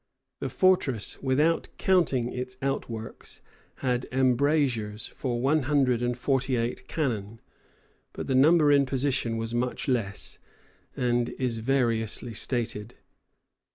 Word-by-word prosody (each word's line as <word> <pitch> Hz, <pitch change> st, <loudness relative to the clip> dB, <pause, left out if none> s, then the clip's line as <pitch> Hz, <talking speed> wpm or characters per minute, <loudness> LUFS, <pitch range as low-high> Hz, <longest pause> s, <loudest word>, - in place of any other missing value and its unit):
The -, -, -3 dB
fortress, 165 Hz, -, +1 dB
without 150 Hz, +5 st, +2 dB
counting 145 Hz, -10 st, +2 dB
its 125 Hz, 0 st, -5 dB
outworks, 115 Hz, -5 st, -4 dB, 0.5 s
had 125 Hz, 0 st, 0 dB
embrasures 130 Hz, -4 st, +1 dB
for 120 Hz, -3 st, -3 dB
one 145 Hz, +5 st, +2 dB
hundred 130 Hz, -5 st, +3 dB
and 120 Hz, 0 st, -1 dB
forty 130 Hz, 0 st, 0 dB
eight 115 Hz, +1 st, -3 dB
cannon; 115 Hz, -8 st, -2 dB, 0.7 s
but -, -, -6 dB
the 135 Hz, -, -1 dB
number 150 Hz, +3 st, +5 dB
in 140 Hz, -1 st, +4 dB
position 130 Hz, -3 st, 0 dB
was 115 Hz, +1 st, -4 dB
much 125 Hz, +1 st, -2 dB
less, 115 Hz, -6 st, -2 dB, 0.6 s
and 120 Hz, -1 st, +1 dB
is 125 Hz, -3 st, -1 dB
variously 115 Hz, -2 st, 0 dB
stated. 115 Hz, -1 st, -3 dB
125 Hz, 120 wpm, -27 LUFS, 115-140 Hz, 0.7 s, number